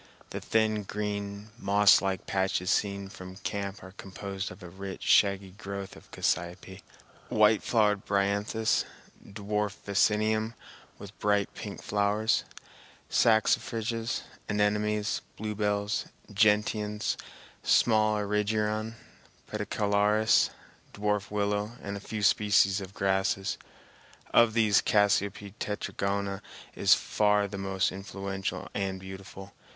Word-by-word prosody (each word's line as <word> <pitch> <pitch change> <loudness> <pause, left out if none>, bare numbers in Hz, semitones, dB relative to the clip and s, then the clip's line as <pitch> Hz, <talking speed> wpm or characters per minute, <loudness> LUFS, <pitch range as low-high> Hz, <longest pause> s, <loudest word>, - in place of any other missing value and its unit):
The - - -5
thin, 110 -1 +1
green, 100 0 -4
mosslike 100 -2 +4
patches 95 -1 0
seen 100 -1 0
from 95 -1 -10
camp 100 0 -4
are 95 - -10
composed 95 0 -6
of 90 +2 -12
a - - -7
rich, 95 +1 -7
shaggy 100 -1 +3
growth 100 -1 -7
of - - -16
cassiope, 90 +3 -2 0.5
white 105 0 +4
flowered 105 -3 +2
bryanthus, 100 +2 +1 0.4
dwarf 105 0 -3
vaccinium 110 +2 +2 0.4
with 100 +1 -12
bright 105 -1 +1
pink - - -8
flowers, 105 +2 +1 0.7
saxifrages, 115 +1 +1 0.3
anemones, 105 0 +1 0.2
bluebells, 105 0 -1 0.3
gentians, 105 0 +2 0.5
small 110 -2 +3
erigeron, 105 +1 -1 0.6
pedicularis, 105 0 +2 0.5
dwarf 105 -1 -1
willow 105 +1 -1
and 100 0 -4
a - - -5
few 105 +1 -5
species 100 0 +4
of 95 0 -9
grasses. 95 0 0 0.7
Of 115 -1 +5
these, 110 -3 +4
Cassiope 100 -1 +1
tetragona 100 -1 -2 0.3
is - - +5
far 105 -1 +2
the 100 0 -6
most 95 -1 0
influential 95 0 -5
and 95 -1 -2
beautiful. 95 +1 -10
100 Hz, 105 wpm, -29 LUFS, 100-105 Hz, 0.7 s, Of